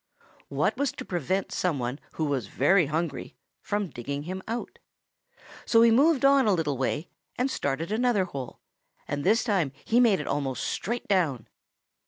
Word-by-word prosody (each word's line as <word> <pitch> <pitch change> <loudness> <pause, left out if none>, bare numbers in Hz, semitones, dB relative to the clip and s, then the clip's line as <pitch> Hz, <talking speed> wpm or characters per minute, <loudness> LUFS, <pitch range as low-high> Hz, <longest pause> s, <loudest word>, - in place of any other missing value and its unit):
What - - 0
was 285 -2 0
to - - -8
prevent 185 +2 -2
some 175 -5 0
one 125 +3 -3
who 160 - -1
was 135 -8 -1
very 165 - +3
hungry 160 0 -3 0.3
from 205 -2 -2
digging 140 +4 -5
him 185 +4 -5
out? 230 +2 -5 0.8
So 230 -1 +5
he 230 - +6
moved 275 +3 +4
on 275 -3 +5
a 205 - +4
little 155 -4 -1
way 135 +5 -2 0.3
and 260 +2 0
started 155 - -2
another 220 -3 +2
hole, 135 -8 -7 0.5
and 145 0 -3
this 225 +8 +3
time 190 - +1
he 235 - +3
made 225 -7 +4
it 150 - -4
almost 135 -4 -2
straight 235 +4 -3
down. 165 - +1
180 Hz, 170 wpm, -27 LUFS, 145-225 Hz, 0.8 s, he